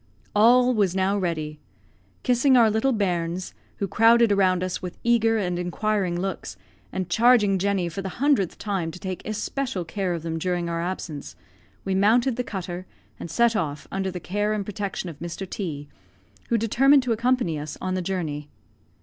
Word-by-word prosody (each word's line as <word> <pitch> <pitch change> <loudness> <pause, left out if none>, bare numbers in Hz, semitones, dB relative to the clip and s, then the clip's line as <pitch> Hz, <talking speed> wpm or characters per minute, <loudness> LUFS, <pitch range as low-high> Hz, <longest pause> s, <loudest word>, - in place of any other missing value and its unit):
All 245 +4 +5
was 200 -5 +1
now 190 +1 +2
ready. 155 -5 -2 0.6
Kissing 255 +1 +4
our 225 -3 +5
little 220 +5 +2
bairns, 180 -4 -1 0.2
who 200 - -2
crowded 230 +1 +5
around 185 -2 +3
us 185 -1 -3
with 180 -2 -6
eager 225 -1 +3
and 180 -4 -1
inquiring 180 0 -1
looks, 195 +1 -4 0.3
and 185 -2 -3
charging 210 -1 +4
Jenny 195 -2 0
for 170 +4 -5
the 190 -1 -6
hundredth 265 - +2
time 195 -6 -2
to 165 - -8
take 185 0 -5
especial 215 -2 -3
care 180 +1 -2
of 165 - -6
them 165 -1 -3
during 175 0 -1
our 170 0 -2
absence, 160 - -5 0.5
we 190 - 0
mounted 225 +6 +3
the 250 - -2
cutter, 185 -4 -6 0.3
and - - -6
set 235 +7 +3
off, 150 -6 -2
under 190 0 -1
the 180 -1 -5
care 205 +4 -1
and 205 -2 -2
protection 200 -2 -4
of 160 -4 -8
Mr. 170 +3 -5
T, 155 -8 -5 0.6
who 235 - +3
determined 265 +5 +4
to 250 - -1
accompany 230 -8 +1
us 150 0 -6
on 185 0 -2
the 185 - -1
journey. 160 -6 -3
190 Hz, 175 wpm, -25 LUFS, 175-225 Hz, 0.6 s, All